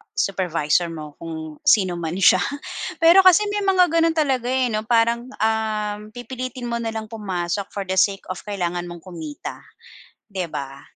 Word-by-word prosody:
supervisor 175 -3 +1
mo 155 -3 -8
kung 160 -2 -7
sino 185 -4 +4
man 165 0 -3
siya. 185 -1 +5 0.6
Pero 335 +3 +8
kasi 370 +3 +7
may 415 - 0
mga 370 -2 +4
ganun 330 0 +3
talaga, 265 -6 +1
eh, 255 0 +1
'no 215 0 -2
parang, 235 +1 +2
um, 220 -3 -1
pipilitin 250 0 -6
mo 235 - -1
na 225 -1 -3
lang 220 -1 -5
pumasok 195 -3 -3
for 200 - -3
the 190 0 -3
sake 195 -1 +2
of 185 - -5
kailangan 175 -3 -2
mong 175 -1 -9
kumita, 160 -5 -7 0.7
'di 190 -4 -4
ba? 135 -1 -6
205 Hz, 165 wpm, -22 LUFS, 175-245 Hz, 0.7 s, Pero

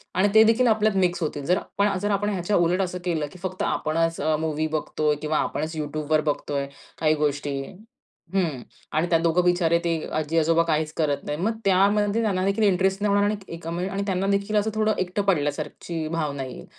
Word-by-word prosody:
आणि 190 +2 +4
ते 220 0 +8
देखील 230 +3 +4
आपल्यात 215 -2 +2
मिक्स 180 -1 +1
होतील. 145 -2 -3
जर 180 +4 +2 0.2
पण 200 +1 +4 0.2
आपण 205 +1 0
ह्याच्या 195 0 -1
उलट 175 +2 +2
असं 180 -1 -2
केलं, 165 -4 0
की 185 - -13
फक्त 185 0 -4
आपणच 165 +1 0
अ, 155 +1 +2
मूव्ही 155 0 -1
बघतोय 155 -1 -1
किंवा 155 0 0
आपणच 155 +2 -2
YouTubeवर 155 0 0
बघतोय 140 -1 -3 0.3
काही 155 -1 +3
गोष्टी. 145 -1 -1 0.8
हं. 165 -10 0 0.3
आणि 155 +3 +1
त्या 165 - +4
दोघं 170 +2 +2
बिचारे 175 -2 +3
ते 170 - 0 0.2
आजी-आजोबा 165 +2 +2
काहीच 155 -2 0
करत 150 -3 0
नाहीत. 150 +1 -3
मग 215 +6 0
त्यामध्ये 200 +3 +3
त्यांना 195 -4 0
देखील 200 +3 +1
इंटरेस्ट 190 0 +2
नाही 205 -1 +2
होणार 205 0 +3 0.4
आणि 170 +3 -3
आणि 200 0 -2
त्यांना 190 0 0
देखील 200 +1 0
असं 210 +1 +1
थोडं 215 0 +2
एकटं 185 +2 -1
पडल्यासारखीची 160 -1 -2
भावना 150 -4 -2
येईल. 130 - -9
170 Hz, 185 wpm, -24 LUFS, 155-195 Hz, 0.8 s, ते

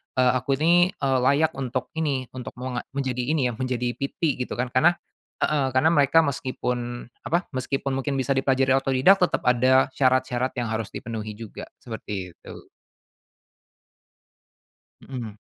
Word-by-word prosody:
eee, 125 -1 +4
aku 135 +2 0
ini, 170 +5 +4
eee, 135 -2 0
layak 145 +4 +3
untuk 130 -1 -3
ini, 135 -5 -1
untuk 125 -4 -7
menga 125 -1 -4
menjadi 130 -3 -2
ini 145 -4 +1
ya, - - -4
menjadi 125 -1 -1
PT 140 +2 -1
gitu - - -6
kan. 125 +1 -2
Karena 160 +8 +4 0.4
heeh. 140 -3 +1
Karena 130 +5 +3
mereka 150 +2 +4
meskipun 125 -3 -3 0.2
apa, 170 +4 0
meskipun 135 +1 -2
mungkin 135 +1 -1
bisa 135 +1 +1
dipelajari 135 0 +2
otodidak 135 +8 +4
tetap 180 - +2
ada 130 +2 +4
syarat-syarat 130 -1 +1
yang 120 - -1
harus 110 -1 -3
dipenuhi 110 -2 -6
juga, 115 -2 -8
seperti 105 -6 -6
itu. - - -13 2.3
Mhm. 120 -5 -7
130 Hz, 145 wpm, -24 LUFS, 125-140 Hz, 2.3 s, eee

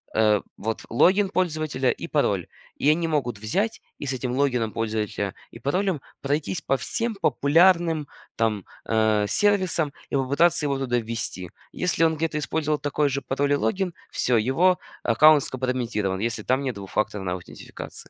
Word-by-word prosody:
э, 105 -2 +4 0.2
вот, 110 +1 -3
логин 190 - +4
пользователя 155 -8 0
и - - -6
пароль. - - 0 0.3
И 145 - +2
они 165 +2 +2
могут 130 -8 -1
взять 195 - -1 0.2
и 145 - -5
с 135 - 0
этим 125 -1 -3
логином 125 -5 +1
пользователя 110 -3 -2 0.2
и 115 - -11
паролем 175 - 0 0.2
пройтись 150 +4 -1
по 135 - +1
всем 230 - -2
популярным 165 0 +3 0.3
там, 110 -4 0 0.2
а, 110 -2 +2
сервисам 185 - +2 0.2
и - - -2
попытаться 140 +5 +2
его 140 -1 0
туда 125 -2 0
ввести. 110 -6 -4 0.2
Если 180 -2 0
он 160 -1 +3
где-то 155 0 -1
использовал 150 0 -1
такой 145 0 0
же 140 +1 -2
пароль 140 +2 0
и - - +5
логин- 175 - -1 0.2
всё, 125 -2 +1
его 165 +11 +3 0.2
аккаунт 145 +5 +6
скомпрометирован, 120 -7 -2
если 110 0 -2
там 130 +5 +1
нет 130 -4 -2
двухфакторной 100 -1 -2
аутентификации. 90 - -9
135 Hz, 155 wpm, -24 LUFS, 115-160 Hz, 0.3 s, аккаунт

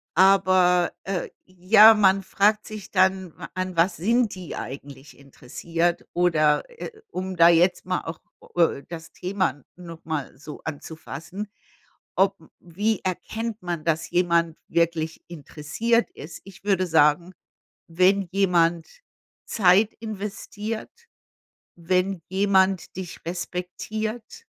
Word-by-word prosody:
Aber, 185 -1 +4
äh 190 -2 -3 0.2
ja, 200 +5 +7
man 195 -2 +3
fragt 210 +3 +2
sich 215 -3 -9
dann, 190 -2 +1
wa 170 - -8
an 185 0 -4
was 175 +2 +3
sind 230 +4 +1
die 185 -3 -8
eigentlich 140 +1 -9
interessiert? 165 +6 -3
Oder, 155 -4 +2
äh, 475 -1 -8 0.2
um 185 - -5
da 170 0 +7
jetzt 175 +2 +3
mal 185 0 -1
auch 165 0 -7 0.4
öh, 165 -5 +2
das 165 -1 -8
Thema 185 -7 -2
noch 170 -2 -11
mal 155 -4 -4
so 150 +2 -10
anzufassen, 165 +5 -7 0.7
ob 195 +1 +2
m 160 - -19
m 170 - -18
wie 215 +2 +1
erkennt 220 +4 -4
man, 170 -3 -4
dass 165 -1 0
jemand 170 -2 +1
wirklich 165 -1 -1
interessiert 175 +9 -1
ist? 160 +3 -10
Ich 195 -1 -14
würde 190 -2 +2
sagen, 160 +2 +3 0.5
wenn 185 +3 +2
jemand 175 -4 +2 0.6
Zeit 205 +1 +3
investiert. 215 0 -6 0.9
Wenn 185 +2 0
jemand 190 -2 +1
dich 185 -3 -8
respektiert. 215 - -5
180 Hz, 120 wpm, -24 LUFS, 165-195 Hz, 0.9 s, ja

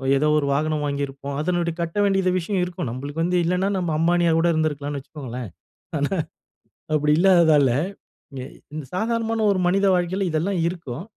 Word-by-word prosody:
ஏதோ 145 +3 +2
ஒரு 145 - +1
வாகனம் 155 +1 0
வாங்கிருப்போம். 140 -1 -3
அதனுடைய 170 0 0
கட்ட 170 +3 -4
வேண்டியத 195 -2 +2
விஷயம் 185 +2 -1
இருக்கும். 175 -7 -5
நம்மளுக்கு 140 +6 -4
வந்து 180 +1 +1
இல்லன்னா, 180 +3 +1
நம்ம 175 -3 -1
அம்பானியா 170 +1 +3
கூட 170 - +2
இருந்திருக்கலாம்னு 145 -2 -1
வச்சுக்கோங்களேன். 130 -5 -7 1.4
ஆனா, 155 - -3
அப்பிடி 150 0 +2
இல்லாததால 165 -7 +5 0.7
எ - - -7 0.3
இந்த 155 -2 -5
சாதாரணமான 225 +2 0
ஒரு 190 - 0
மனித 195 +3 +2
வாழ்க்கைல 180 +2 0
இதெல்லாம் 175 +4 0
இருக்கும். 170 -5 -5
165 Hz, 150 wpm, -23 LUFS, 145-180 Hz, 1.4 s, இல்லாததால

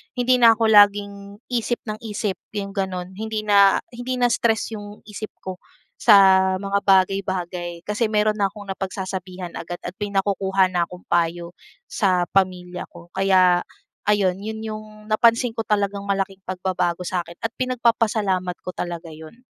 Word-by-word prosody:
Hindi 250 0 +2
na 230 -2 +7
ako 225 -1 +2
laging 200 -1 +4 0.2
isip 240 0 -1
ng 215 -1 -5
isip, 210 -3 -3 0.2
'yong 200 -1 -3
gano'n. 190 -2 -3
Hindi 215 +2 -4
na 200 -2 +5
hindi 245 +1 -4
na 245 -1 +2
stress 225 -1 +1
'yong 205 -1 -9
isip 215 0 -8
ko 185 -1 -6 0.4
sa 190 -3 +6
mga 200 +1 -1
bagay-bagay 185 -3 +1
kasi 210 +2 -1
meron 215 0 +1
na 200 - +3
akong 200 0 -8
napagsasabihan 185 -2 -5
agad 175 +1 -7
at 175 - -4
may 205 -1 -4
nakukuha 195 -1 +1
na 175 -1 0
akong 180 0 -12
payo 170 0 0 0.4
sa 185 -4 +2
pamilya 180 -2 -1
ko. 170 0 -15
Kaya 185 -2 +3 0.4
ayon, 195 -3 +2
'yon 220 +2 -6
yung 215 -1 -6 0.3
napansin 230 +2 +3
ko 225 0 -5
talagang 200 -1 0
malaking 195 -1 -1
pagbabago 180 -1 -2
sa 180 0 -2
akin 170 +1 -12
at 225 - -1
pinagpapasalamat 220 -7 +1
ko 180 - -5
talaga 170 -2 -5
'yon. 160 +10 -13
195 Hz, 155 wpm, -22 LUFS, 185-215 Hz, 0.4 s, na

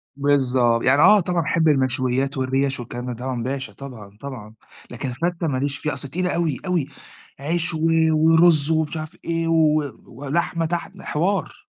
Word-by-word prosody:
بالضبط، 130 -4 +2
يعني 140 +3 +4
آه 210 +5 +7
طبعًا 175 -1 -1
أحب 160 +1 +1
المشويات 130 -1 +1
والريَش 135 +1 0
والكلام 120 +1 -6
ده 125 - -4
طبعًا 125 0 -4
باشا 135 +2 -4
طبعًا، 110 -7 -11
طبعًا. 120 -6 -9 0.4
لكن 130 +2 -5
الفتّة 170 +6 -2
ما 135 -4 -1
ليش 140 +1 -1
فيها، 150 +3 -3
أصل 140 - -1
تقيلة 180 +5 -1
أوي، 165 -6 0
أوي. 175 -7 0 0.5
عيش 165 +4 -1
و 160 - -3 0.3
ورز 160 -1 +5
ومش 160 0 0
عارف 155 +2 -7
إيه 165 0 -1
و 155 -2 +3 0.2
ولحمة 160 +6 -2
تحت، 175 +4 -4
حوار. 180 +7 -2
145 Hz, 165 wpm, -22 LUFS, 130-165 Hz, 0.5 s, آه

